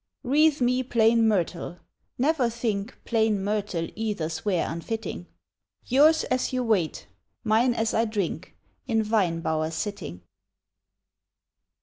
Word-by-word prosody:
Wreath 295 +2 +3
me 250 +1 +2
plain 230 -2 +3
myrtle; 175 -4 -1 0.4
never 270 -2 +2
think 225 -2 -3
Plain 220 -4 +1
myrtle 200 -5 -2
either's 165 -8 -3
wear 185 -5 +1
unfitting, 165 - -5 0.6
Yours 300 +5 +4
as 255 - -1
you 255 -1 -1
wait, 205 -9 0 0.4
mine 230 +3 +3
as 225 -1 0
I 225 - +2
drink 200 -5 -3 0.3
In 225 -3 +1
vine 195 -7 +1
bower 155 -1 -1
sitting. 160 - -5
220 Hz, 115 wpm, -26 LUFS, 180-240 Hz, 0.6 s, Yours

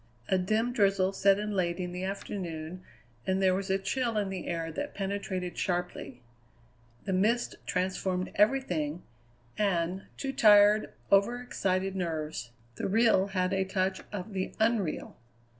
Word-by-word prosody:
A 190 - +3
dim 220 +6 +1
drizzle 195 -3 +2
set 195 0 +4
in 210 +1 -3
late 175 -3 0
in 180 -1 -3
the 180 +1 -5
afternoon, 185 -3 -5 0.5
and 190 0 +2
there 190 -1 +4
was 190 +1 -2
a 190 - +3
chill 230 +4 -1
in 205 -2 0
the 190 -2 -5
air 165 -1 -2
that 290 - -5
penetrated 195 -2 -3
sharply. 175 -8 -3 0.8
The 195 - -1
mist 220 +6 +2
transformed 185 0 -1
everything, 180 - +1 0.6
and, 185 -2 0
to 270 -1 -3
tired, 210 -4 +6 0.2
overexcited 195 -3 +1
nerves, 160 -7 -3 0.3
the - - -2
real 215 -1 +4
had 185 -1 0
a 190 0 +2
touch 190 0 -1
of 205 0 -6
the 190 -1 -3
unreal. 220 -7 0
190 Hz, 140 wpm, -30 LUFS, 180-205 Hz, 0.8 s, tired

